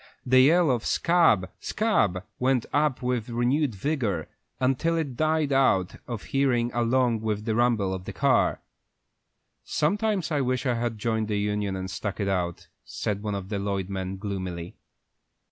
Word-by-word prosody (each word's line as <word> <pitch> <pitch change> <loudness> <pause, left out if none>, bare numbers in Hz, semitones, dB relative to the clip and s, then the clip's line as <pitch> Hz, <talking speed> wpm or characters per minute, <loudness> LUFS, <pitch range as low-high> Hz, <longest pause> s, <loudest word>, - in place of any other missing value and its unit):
The 130 0 +5
yell 160 +2 +5
of 120 -2 0
"Scab, 140 - +3
scab!" 105 - +1 0.2
went 130 -2 +2
up 145 -3 +1
with 125 -2 -1
renewed 120 +2 +1
vigor, 105 - -1 0.3
until 135 +6 +1
it 145 -6 -2
died 155 0 +1
out 105 -9 +2
of 115 -4 -5
hearing 125 -3 +1
along 120 -1 +1
with 105 -1 -2
the 110 - 0
rumble 110 -5 +2
of 95 -1 -6
the - - -5
car. - - +2 1.0
"Sometimes 200 +2 0
I 145 -2 +1
wish 130 0 -1
I 125 - +2
had 115 -1 -2
joined 110 0 -1
the 105 -1 -1
union 105 -1 -1
and 95 0 -4
stuck 100 +1 -4
it 100 - -1
out," 90 -3 -2 0.2
said 105 -2 -3
one 105 -1 -3
of 95 -1 -6
the 105 -2 -2
Lloyd 100 -1 -2
men, 95 0 -4
gloomily. 95 -4 -5
115 Hz, 160 wpm, -26 LUFS, 100-135 Hz, 1.0 s, The